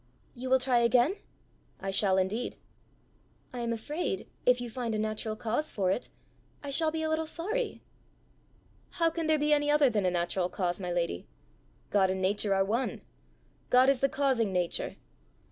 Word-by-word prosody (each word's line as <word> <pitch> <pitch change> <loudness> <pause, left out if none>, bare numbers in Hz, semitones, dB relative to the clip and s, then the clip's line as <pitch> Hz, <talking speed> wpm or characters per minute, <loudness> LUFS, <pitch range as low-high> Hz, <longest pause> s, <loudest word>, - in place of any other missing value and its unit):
"You 255 0 -6
will 260 - +6
try 250 -1 +2
again?" 245 - +3 0.6
"I 195 0 -3
shall 190 -1 +2
indeed." 195 +6 -1 1.0
"I 250 - -5
am 235 -1 -1
afraid, 230 - -3 0.2
if 250 0 +5
you 245 - -4
find 235 -1 -3
a - - 0
natural 215 0 -2
cause 235 +8 -2
for 190 -3 +1
it, 215 - -2 0.5
I 285 - -5
shall 315 +3 +2
be 320 0 -3
a - - 0
little 315 0 0
sorry." 430 +11 -3 1.1
"How 330 -1 +3
can 325 -1 -2
there 310 -1 +4
be 300 0 +2
any 290 0 +2
other 295 -3 +5
than 205 -4 +1
a - - +4
natural 175 +1 0
cause, 180 -1 -2
my 180 -2 -3
lady? 170 - -2 0.6
God 195 -2 +4
and 190 0 -1
Nature 200 +1 +1
are 195 0 +3
one. 230 +6 -1 0.7
God 255 +1 +6
is 275 -2 +3
the 275 - +2
causing 260 -8 +1
Nature. 180 -2 -1
235 Hz, 180 wpm, -30 LUFS, 195-285 Hz, 1.1 s, will